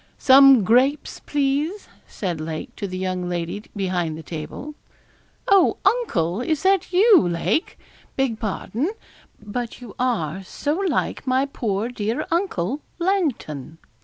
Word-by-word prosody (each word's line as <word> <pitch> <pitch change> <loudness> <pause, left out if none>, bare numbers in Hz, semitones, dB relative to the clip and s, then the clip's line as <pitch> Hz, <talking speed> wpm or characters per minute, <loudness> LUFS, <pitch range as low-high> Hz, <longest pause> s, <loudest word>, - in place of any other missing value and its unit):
'Some 270 -3 +7
grapes, 260 +8 +2
please,' 290 +7 -1 0.2
said 175 -6 -4
Lake, 155 0 -6
to 200 - -4
the 185 -1 -5
young 185 -1 -2
lady 175 +3 -3
behind 180 -5 -1
the 160 - -9
table. 165 - -7 0.7
'Oh, 395 -2 +4
uncle! 195 - +1
Is 310 +4 -1
that 385 -1 +2
you, 395 +2 +6
Lake? 175 - -1 0.4
beg 260 -5 0
pardon; 225 - -2 0.5
but 225 +3 -5
you 240 -5 -10
are 195 - -1
so 290 +10 -2
like 355 -6 -1
my 260 +1 +2
poor 220 -6 -2
dear 225 -1 -2
uncle, 295 - -1 0.2
Langton. 290 - -2
240 Hz, 130 wpm, -22 LUFS, 180-295 Hz, 0.7 s, Some